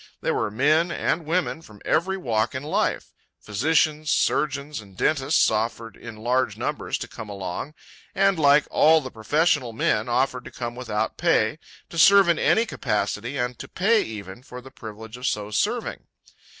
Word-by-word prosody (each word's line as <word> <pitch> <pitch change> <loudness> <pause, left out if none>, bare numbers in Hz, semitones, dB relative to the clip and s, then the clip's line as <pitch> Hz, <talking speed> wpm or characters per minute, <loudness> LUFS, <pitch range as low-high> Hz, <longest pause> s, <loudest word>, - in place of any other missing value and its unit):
There - - -1
were - - -1
men 155 - +2
and 160 -2 -1
women 170 -1 -1
from 110 -9 -15
every 190 +2 +1
walk 115 - -1
in 130 - -4
life. 150 - -1 0.3
Physicians, 155 +7 +1
surgeons, 140 -2 0
and 100 -3 -17
dentists 145 - +2
offered 115 0 -2
in 115 -2 -10
large 125 +3 0
numbers - - -3
to - - -6
come 110 -2 -9
along, 100 - -5 0.4
and, 195 -2 +3
like 145 0 +5
all 160 +1 +5
the 130 -4 -7
professional 130 +2 +1
men, 110 0 0
offered 125 +1 0
to - - -9
come 120 -1 -5
without 110 -4 -3
pay, - - +2 0.3
to 170 - -3
serve 200 +2 +7
in 170 - +2
any 225 - +3
capacity, 110 - -2
and 125 -1 -2
to - - -7
pay, 215 +4 +2
even, 100 -1 -7
for 125 -1 -10
the 130 +1 -13
privilege 110 +1 -10
of 125 +2 -3
so 105 0 -2
serving. - - -2
130 Hz, 170 wpm, -24 LUFS, 110-155 Hz, 0.4 s, serve